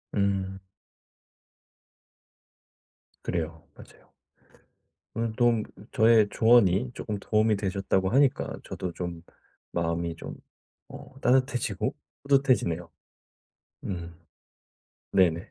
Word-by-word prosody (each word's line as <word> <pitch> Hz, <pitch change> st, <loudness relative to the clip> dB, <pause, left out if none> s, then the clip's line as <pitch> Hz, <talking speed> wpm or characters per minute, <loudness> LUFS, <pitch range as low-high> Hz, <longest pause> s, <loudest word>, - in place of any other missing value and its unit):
음. 95 Hz, -1 st, 0 dB, 2.6 s
그래요. 80 Hz, -2 st, -3 dB
맞아요. -, -, -17 dB, 1.0 s
오늘 115 Hz, 0 st, -1 dB
도움 120 Hz, -2 st, +3 dB, 0.3 s
저의 110 Hz, -1 st, +5 dB
조언이 115 Hz, 0 st, +4 dB
쪼끔 105 Hz, -2 st, -4 dB
도움이 110 Hz, +1 st, +2 dB
되셨다고 95 Hz, -1 st, 0 dB
하니까 135 Hz, +2 st, +2 dB
저도 90 Hz, -2 st, -5 dB
좀 85 Hz, -2 st, -5 dB, 0.5 s
마음이 85 Hz, 0 st, -1 dB
좀 -, -, -8 dB, 0.5 s
어 130 Hz, -, -12 dB
따뜻해지고 130 Hz, -1 st, +1 dB, 0.3 s
뿌듯해지네요. 130 Hz, -, +2 dB, 0.9 s
음. 85 Hz, -3 st, -5 dB, 1.0 s
네네. 90 Hz, 0 st, +2 dB
100 Hz, 195 characters per minute, -27 LUFS, 85-115 Hz, 2.6 s, 저의